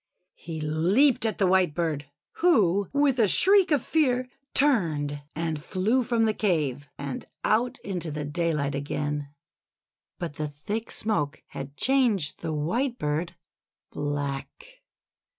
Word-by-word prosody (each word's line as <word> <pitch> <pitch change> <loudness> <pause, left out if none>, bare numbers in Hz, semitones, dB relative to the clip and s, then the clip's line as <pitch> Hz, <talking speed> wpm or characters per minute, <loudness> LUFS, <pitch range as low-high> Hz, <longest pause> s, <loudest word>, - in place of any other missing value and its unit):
He 165 -2 -6
leaped 185 - +3
at 220 - -2
the 195 - +2
Whitebird, 170 -5 +1 0.3
who 205 - +3
with 280 -2 +2
a 220 - +5
shriek 385 - +5
of 290 -6 +2
fear, 255 -5 +2 0.3
turned 155 - +1
and 160 -2 -2
flew 210 +11 +1
from 235 -2 +1
the 215 - +2
cave, 150 - 0
and 140 -2 -5 0.2
out 245 +4 +1
into 180 -4 -3
the 150 0 -4
daylight 150 -2 -1
again. 145 +1 -3 0.9
But 165 -4 -5
the 155 - -2
thick 200 +10 -5
smoke 155 -9 -1
had 140 +1 -8
changed 240 - +2
the 165 - -3
White 230 - -1
bird 155 +4 -2 0.6
black. 145 - -4
175 Hz, 130 wpm, -26 LUFS, 150-240 Hz, 0.9 s, a